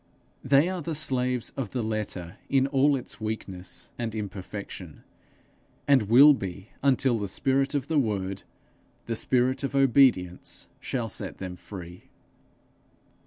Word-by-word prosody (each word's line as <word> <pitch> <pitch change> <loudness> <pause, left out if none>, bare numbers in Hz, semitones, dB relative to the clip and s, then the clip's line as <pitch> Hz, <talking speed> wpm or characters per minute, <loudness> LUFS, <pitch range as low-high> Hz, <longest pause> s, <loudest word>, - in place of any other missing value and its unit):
They 140 +4 +4
are 185 -1 -3
the 165 0 -3
slaves 125 -4 0
of 130 -6 -3
the 125 -3 -1
letter 105 -5 -4
in 135 -1 +3
all 140 +1 +3
its 125 -3 -6
weakness 100 -4 -5
and 115 -2 -3
imperfection, 100 -4 -7 0.8
and 130 -8 +4
will 140 +6 +9
be 95 -3 -6
until 130 -3 +3
the 100 - -2
spirit 135 +7 +1
of 140 -1 -1
the 160 -2 +2
Word, 100 -5 -1 0.6
the 115 - -2
spirit 125 +3 +1
of 135 0 -2
obedience 130 -10 +3
shall 120 -4 -2
set 110 - -5
them 90 -2 -6
free. 90 -1 -10
120 Hz, 135 wpm, -27 LUFS, 100-135 Hz, 0.8 s, will